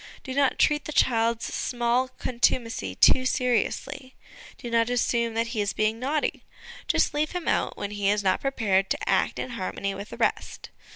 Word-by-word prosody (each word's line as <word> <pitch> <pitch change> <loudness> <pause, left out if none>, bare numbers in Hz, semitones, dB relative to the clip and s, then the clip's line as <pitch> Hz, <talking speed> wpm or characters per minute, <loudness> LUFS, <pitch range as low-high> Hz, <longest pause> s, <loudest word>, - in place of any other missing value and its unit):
Do 260 - -6
not 275 0 +2
treat 300 -1 +2
the - - -5
child's 230 -4 +2
small 240 +1 0
contumacy 245 -2 -1
too 255 - +5
seriously; 255 +1 -1 0.4
do 240 - -7
not 230 0 +2
assume 235 -2 0
that 230 +1 0
he 215 - 0
is 205 - -1
being 215 +1 0
naughty: 290 +4 -1 0.4
just - - +2
leave 300 +2 -1
him 360 -2 -4
out - - 0
when 205 - -4
he 205 -1 0
is 205 0 +1
not 190 - +1
prepared 200 -8 +1
to - - -2
act - - +1
in 255 - -4
harmony 200 -2 -3
with 200 +2 -8
the - - -9
rest. - - -2
235 Hz, 180 wpm, -26 LUFS, 215-260 Hz, 0.4 s, too